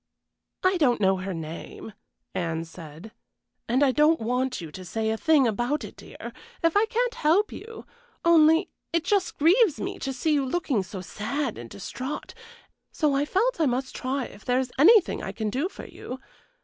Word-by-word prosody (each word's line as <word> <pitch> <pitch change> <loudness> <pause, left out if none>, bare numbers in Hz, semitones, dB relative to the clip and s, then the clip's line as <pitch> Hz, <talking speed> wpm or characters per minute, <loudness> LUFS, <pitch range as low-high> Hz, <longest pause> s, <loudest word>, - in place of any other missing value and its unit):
"I 370 0 +3
don't 255 -7 +3
know 190 -1 +3
her 190 +1 -4
name," 165 +6 -8 0.4
Anne 165 -3 -2
said, 165 +4 -11 0.6
"and 255 +4 +3
I 275 - +4
don't 300 +4 +4
want 250 +3 -1
you 165 -3 -8
to 185 - -9
say 220 +4 -2
a - - 0
thing 305 +2 +4
about 240 +7 -1
it, - - -9
dear, - - -10 0.3
if 330 +1 +3
I 425 +2 +4
can't 485 +1 0
help 395 0 +2
you; 455 +1 -9 0.4
only 325 +1 +5 0.2
it 335 -1 +1
just 390 0 0
grieves 345 - +4
me - - -4
to 270 - -3
see 285 +4 0
you 285 -2 +2
looking 265 - 0
so 190 0 -7
sad 220 - -3
and 120 -1 -9
distrait, 255 - -6 0.6
so 300 -3 +1
I 280 +1 +1
felt 425 +5 +1
I 310 - +4
must 260 +1 -2
try 260 0 -2
if - - -13
there 250 0 +1
is 260 -1 -2
anything 395 +5 +6
I - - -4
can 215 -2 -3
do 280 - -1
for - - -10
you. 255 - -8
270 Hz, 190 wpm, -26 LUFS, 220-330 Hz, 0.6 s, anything